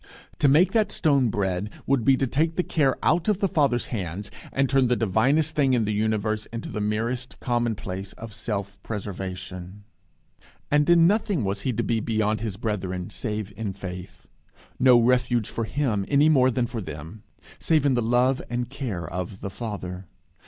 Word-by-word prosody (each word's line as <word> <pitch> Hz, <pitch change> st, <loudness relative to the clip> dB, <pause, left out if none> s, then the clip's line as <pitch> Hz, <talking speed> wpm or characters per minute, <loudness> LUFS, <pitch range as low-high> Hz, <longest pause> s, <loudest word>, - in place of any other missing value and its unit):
To 145 Hz, -, +4 dB
make 155 Hz, +7 st, +5 dB
that 220 Hz, -2 st, +2 dB
stone 140 Hz, -6 st, +2 dB
bread 95 Hz, -1 st, -1 dB, 0.2 s
would 135 Hz, -3 st, +2 dB
be 135 Hz, +1 st, +5 dB
to 135 Hz, -, +1 dB
take 160 Hz, +6 st, 0 dB
the 180 Hz, -, +1 dB
care 140 Hz, -7 st, +1 dB
out 170 Hz, +1 st, +2 dB
of 210 Hz, -3 st, +2 dB
the 200 Hz, -, +2 dB
Father's 140 Hz, -8 st, +1 dB
hands, 100 Hz, -1 st, -4 dB, 0.2 s
and 135 Hz, 0 st, +1 dB
turn 135 Hz, -1 st, +3 dB
the 125 Hz, -, +2 dB
divinest 135 Hz, +9 st, +2 dB
thing 140 Hz, -4 st, +2 dB
in 115 Hz, -3 st, +1 dB
the 105 Hz, -, -1 dB
universe 110 Hz, 0 st, 0 dB
into 115 Hz, 0 st, -6 dB
the 105 Hz, -, -4 dB
merest 115 Hz, +5 st, -2 dB
commonplace 110 Hz, -6 st, -2 dB
of 115 Hz, -2 st, -9 dB
self 100 Hz, -2 st, -4 dB
preservation. 95 Hz, -2 st, -6 dB, 0.9 s
And 150 Hz, +1 st, +3 dB
in 170 Hz, -1 st, +7 dB
nothing 200 Hz, -, +2 dB
was 100 Hz, +1 st, -2 dB
he 130 Hz, -, -1 dB
to -, -, -1 dB
be 115 Hz, -, 0 dB
beyond 110 Hz, -1 st, 0 dB
his 110 Hz, -4 st, -3 dB
brethren, 95 Hz, -5 st, -3 dB
save 105 Hz, -3 st, -4 dB
in 105 Hz, -2 st, -4 dB
faith. 90 Hz, -2 st, -8 dB, 0.5 s
No 125 Hz, -2 st, +7 dB
refuge 120 Hz, -2 st, +2 dB
for 115 Hz, -, -2 dB
him, 115 Hz, -4 st, 0 dB
any 145 Hz, +2 st, +4 dB
more 130 Hz, -4 st, +5 dB
than 125 Hz, -1 st, 0 dB
for 115 Hz, -1 st, -5 dB
them, 80 Hz, +4 st, -8 dB, 0.4 s
save 155 Hz, -3 st, +2 dB
in 140 Hz, -, +4 dB
the 120 Hz, -, +1 dB
love 125 Hz, +3 st, +2 dB
and 120 Hz, 0 st, -3 dB
care 110 Hz, -, -4 dB
of 90 Hz, +3 st, -5 dB
the 100 Hz, -, -5 dB
Father. 95 Hz, -4 st, -6 dB
115 Hz, 180 wpm, -25 LUFS, 100-135 Hz, 0.9 s, in